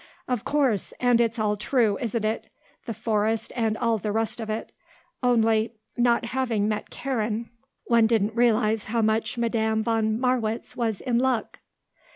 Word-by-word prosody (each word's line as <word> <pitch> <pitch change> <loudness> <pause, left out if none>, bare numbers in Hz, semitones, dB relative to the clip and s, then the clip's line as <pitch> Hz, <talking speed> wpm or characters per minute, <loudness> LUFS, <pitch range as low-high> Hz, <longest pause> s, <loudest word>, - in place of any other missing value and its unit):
"Of 250 -4 -1
course; 270 -8 0
and 245 -1 +4
it's 230 0 0
all 210 -1 +1
true, 220 0 +1
isn't 230 -2 -1
it; 220 +1 -2 0.4
the 230 - -2
forest 220 +1 -1
and 225 -3 0
all 230 -1 +1
the 210 +2 -2
rest 225 +2 -1
of 220 -1 -5
it. 215 +1 -4 0.5
Only, 225 -2 +2 0.2
not 240 -1 +2
having 235 -4 0
met 215 -1 -2
Karen, 230 -3 -3 0.3
one 230 -2 +4
didn't 220 -1 +1
realize 225 -2 +2
how 225 +1 0
much 220 +2 0
Madame 220 -2 +1
von 220 -1 +1
Marwitz 240 -3 -1
was 225 -4 -1
in 240 -2 +1
luck." 255 -3 0
225 Hz, 160 wpm, -25 LUFS, 220-240 Hz, 0.5 s, and